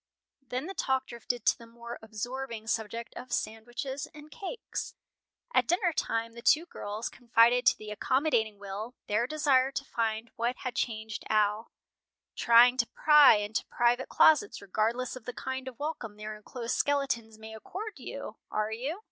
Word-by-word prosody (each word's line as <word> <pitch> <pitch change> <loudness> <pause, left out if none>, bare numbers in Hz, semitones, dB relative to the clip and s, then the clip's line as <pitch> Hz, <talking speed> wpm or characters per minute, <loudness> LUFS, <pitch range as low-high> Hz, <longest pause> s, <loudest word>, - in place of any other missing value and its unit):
Then 255 +1 -4
the 385 - -5
talk 265 -6 0
drifted 240 0 -4
to - - +5
the 230 - -12
more 235 +1 -9
absorbing 230 +1 -5
subject 225 +1 -3
of 250 0 -9
sandwiches 240 +5 -3
and 300 0 -12
cakes. 405 +8 -6 0.6
At - - +3
dinner 350 -1 +2
time 230 -4 -1
the 235 - -10
two 315 +7 +4
girls 210 -8 -5
confided 240 +1 +3
to - - +6
the 215 0 -8
accommodating 225 -2 +1
Will 205 +5 -6
their 215 +4 +1
desire 270 -3 +3
to 275 +1 -3
find 225 -1 -2
what 240 +2 0
had 255 - -2
changed 220 -3 -3
Al. 215 +1 +1 0.6
"Trying 240 +2 +6
to 235 -2 +2
pry 300 -5 +7
into 210 +1 -2
private 240 +2 +1
closets, 315 +7 +4
regardless 225 +6 -1
of 250 -4 -10
the 250 - -5
kind 260 +1 -4
of 255 -3 -7
welcome 285 -9 -5
their 215 0 -6
enclosed 230 +3 -5
skeletons 270 -6 0
may 220 0 -10
accord 390 - -6
you, 250 -3 -7
are 215 0 -1
you?" 270 - -3
235 Hz, 165 wpm, -30 LUFS, 220-265 Hz, 0.6 s, pry